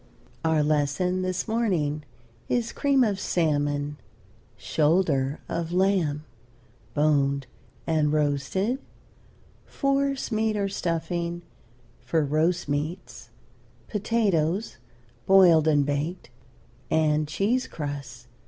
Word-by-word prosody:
Our 160 -2 +2
lesson 155 +5 +1
this 185 +1 -2
morning 180 -10 0 0.5
is 235 -2 0
cream 275 -2 +2
of 205 -4 0
salmon; 145 -4 0 0.6
shoulder 150 - +1
of 170 0 -3
lamb, 175 -5 +1 0.7
boned 140 -2 +2 0.4
and 155 -2 +1
roasted; 155 - 0 0.9
force 275 -1 0
meat 220 -1 +1
or 200 -1 0
stuffing 170 -1 -2 0.6
for 160 -2 0
roast 160 +5 +1
meats; 145 -4 -4 0.6
potatoes, 205 -3 0 0.5
boiled 175 -5 +6
and 145 -2 +3
baked; 145 +1 -3 0.6
and 155 -1 +2
cheese 220 +11 0
crusts. 140 -5 -6
160 Hz, 90 wpm, -26 LUFS, 145-195 Hz, 0.9 s, boiled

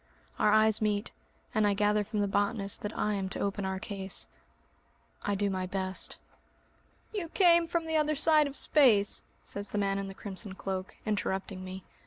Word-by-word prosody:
Our 210 - +4
eyes 215 0 +4
meet, 210 +1 0 0.4
and 215 -1 +3
I 200 - +2
gather 210 +1 +2
from 210 0 -2
the 205 - +1
botanist 200 0 +1
that 210 +1 -5
I 210 - +1
am 195 -2 -2
to - - -5
open 200 0 -2
our 190 0 -2
case. 195 -1 -3 0.9
I 205 - -1
do 200 +1 0
my 185 -1 -2
best. 190 0 -2 1.0
"You 375 -6 -3
came 340 -2 +5
from 335 0 -1
the 320 0 0
other 305 0 +2
side 305 0 +4
of 280 - -4
space!" 225 -9 +4 0.2
says 200 0 -3
the - - -3
man 195 -1 +1
in 195 - -4
the 195 - -8
crimson 195 0 -5
cloak, 190 -1 -4
interrupting 195 -2 -2
me. 185 0 -7
205 Hz, 185 wpm, -30 LUFS, 195-220 Hz, 1.0 s, came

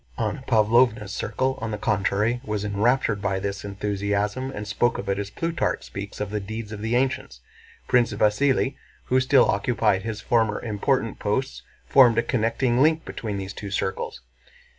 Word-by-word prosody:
Anna 115 +4 -2
Pávlovna's 110 -2 +3
circle 130 +6 -2
on 115 - -3
the 105 - -3
contrary 105 +3 0
was 105 -3 -3
enraptured 105 +1 +1
by 100 -1 0
this 100 0 -4
enthusiasm 100 +4 -2
and 105 -5 -6
spoke 115 +3 +1
of 100 - -6
it 100 0 0
as 100 -1 -4
Plutarch 165 +9 -2
speaks 100 +1 -7
of 105 -1 -3
the 105 - -1
deeds 110 +2 -6
of 105 -1 -6
the 115 +2 0
ancients. 130 - -1 0.5
Prince 120 -2 +3
Vasíli, 130 +6 +2 0.3
who 130 - +2
still 130 0 +5
occupied 105 -1 +1
his 110 0 -4
former 110 -4 +1
important 115 +2 -1
posts, 130 +6 -2 0.2
formed 125 -4 +6
a 115 - +3
connecting 120 +1 +1
link 160 +2 +3
between 105 -3 -4
these 95 0 -5
two 100 - -7
circles. 95 0 -3
110 Hz, 165 wpm, -24 LUFS, 100-125 Hz, 0.5 s, formed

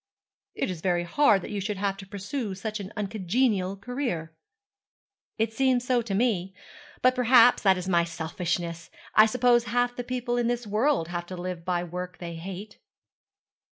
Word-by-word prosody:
'It - - -1
is 170 -3 -7
very 175 -1 +1
hard 200 +1 +3
that - - -7
you 205 -1 -2
should 205 +1 -3
have 195 0 -1
to 195 -1 -11
pursue 200 +2 -4
such 215 +3 -4
an 200 0 -7
uncongenial 200 -1 0
career.' 200 - -4 1.0
'It 225 0 0
seems 255 0 +2
so 250 -1 +2
to 215 -4 -3
me; 195 -5 0 0.5
but, 255 0 +6
perhaps, 250 0 +6
that 190 -2 +4
is 180 0 -5
my 170 -2 +3
selfishness. 170 0 -3 0.2
I 215 +1 +7
suppose 240 0 +3
half 245 0 0
the 245 - -4
people 245 0 -2
in 240 -1 +1
this 240 0 -1
world 215 - +1
have 175 0 -4
to 185 - -7
live 175 -1 -5
by 175 0 -1
work 180 +1 -6
they 170 -1 -6
hate.' 190 +5 -8
200 Hz, 175 wpm, -27 LUFS, 180-240 Hz, 1.0 s, I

